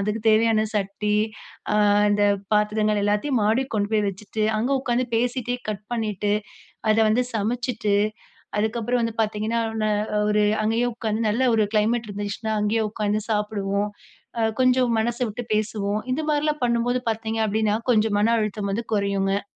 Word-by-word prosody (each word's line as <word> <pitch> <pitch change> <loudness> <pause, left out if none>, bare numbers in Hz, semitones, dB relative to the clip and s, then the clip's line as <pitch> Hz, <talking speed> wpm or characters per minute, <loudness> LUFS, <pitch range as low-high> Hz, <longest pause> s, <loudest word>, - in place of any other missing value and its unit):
அதுக்கு 210 +2 -1
தேவையான 220 0 +4
சட்டி, 210 +1 -1 0.6
ஆ - - +2 0.4
இந்த 205 0 +2 0.3
பாத்திரங்கள் 210 0 +2
எல்லாத்தையும் 210 +5 +1
மாடிக்கு 230 +5 +1
கொண்டு 205 -1 0
போய் 210 -1 +2
வச்சுட்டு, 210 +3 -5 0.2
அங்க 245 +5 -1
உக்காந்து 250 -1 0
பேசிட்டே 245 +1 0
கட் 210 -1 -3
பண்ணிட்டு, 210 -3 -1 0.6
அத 215 - +4
வந்து 235 +4 +3
சமைச்சுட்டு, 230 -1 -1 0.6
அதுக்கப்புறம் 230 +3 0
வந்து 230 -1 -2
பாத்தீங்கன்னா, 215 +2 -1 0.2
நா 215 - +2
நா 210 0 -1
ஒரு 210 0 +3 0.2
அங்கேயே 225 +3 +1
உக்காந்து 220 -1 -2
நல்ல 230 +5 +1
ஒரு 215 -1 +3
கிளைமெட் 220 +1 +1
இருந்துச்சுனா 205 +2 -3
அங்கேயே 220 +2 +1
உட்காந்து 210 0 -1
சாப்பிடுவோம், 210 -1 -1 0.5
அ - - +2 0.2
கொஞ்சம் 255 -2 +3
மனசு 240 +2 -1
விட்டு 230 +3 -6
பேசுவோம் 210 -1 -1
இது 310 +4 -1
மாரிலாம் 300 -1 0
பண்ணும்போது 240 +1 +1
பாத்தீங்க 225 0 -3
அப்டின்னா, 215 0 +1
கொஞ்சம் 215 -2 +3
மன 230 +2 +3
அழுத்தம் 210 -2 -2
வந்து 230 +3 -2
குறையுங்க. 200 -1 0
215 Hz, 150 wpm, -24 LUFS, 210-235 Hz, 0.6 s, தேவையான